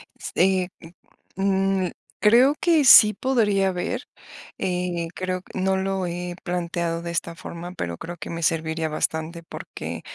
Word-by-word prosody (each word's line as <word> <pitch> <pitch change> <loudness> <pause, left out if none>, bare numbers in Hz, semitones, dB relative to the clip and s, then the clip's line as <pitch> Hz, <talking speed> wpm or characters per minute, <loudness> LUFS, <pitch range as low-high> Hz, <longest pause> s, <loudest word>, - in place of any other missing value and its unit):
S - - -8
eh, 185 0 +3
m 165 +1 -14 0.9
mm. - - -7 0.3
Creo 245 +7 +5
que 330 -4 +3
sí 215 -4 +9
podría 210 -6 +1
haber, 180 -1 -2 0.6
eh, 180 -2 -2
creo 185 0 -3
q - - -16
no 190 0 +1
lo 190 -1 -1
he 175 0 -4
planteado 170 -1 -2
de 170 - -4
esta 170 0 -3
forma, 175 +2 -8
pero 85 - -4
creo 175 +1 -7
que - - -7
me 170 0 -5
serviría 160 0 0
bastante, 160 +2 -2
porque, - - -7
180 Hz, 155 wpm, -24 LUFS, 170-190 Hz, 0.9 s, sí